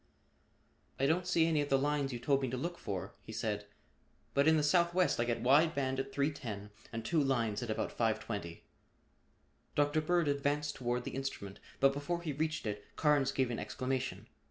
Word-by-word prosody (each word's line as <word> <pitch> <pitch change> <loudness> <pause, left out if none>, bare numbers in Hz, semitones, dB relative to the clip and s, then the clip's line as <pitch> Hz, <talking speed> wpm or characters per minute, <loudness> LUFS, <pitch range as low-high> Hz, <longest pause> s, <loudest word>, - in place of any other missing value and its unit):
"I 135 - +3
don't 175 +5 +2
see 165 -2 +4
any 160 -2 +2
of 145 - -3
the 135 - +4
lines 145 0 0
you 120 - -3
told 135 +3 +1
me 130 - -1
to 130 - -3
look 170 +6 -4
for," 95 -3 -4
he - - -10
said, 110 -2 -2 0.7
"but 140 +2 +3
in 160 0 +6
the 150 - +2
southwest 175 +2 +3
I 120 - +2
get 120 -1 -1
wide 155 +6 +5
band 135 -1 0
at 135 0 -3
310 115 -9 -2 0.2
and 115 -1 -5
two 160 +1 +2
lines 115 -6 0
at 120 - -4
about 110 - -1
520." 105 -6 -2 1.1
Dr. 145 +2 +3
Bird 170 0 +2
advanced 145 +1 0
toward 125 -1 -2
the - - -5
instrument 130 -8 -5 0.2
but 135 0 +5
before 170 +5 -3
he 155 -4 -2
reached 155 0 -2
it, 105 -1 -3
Carnes 145 -3 +3
gave 130 -2 0
an 115 - -3
exclamation. 130 0 -3
135 Hz, 190 wpm, -34 LUFS, 120-150 Hz, 1.1 s, in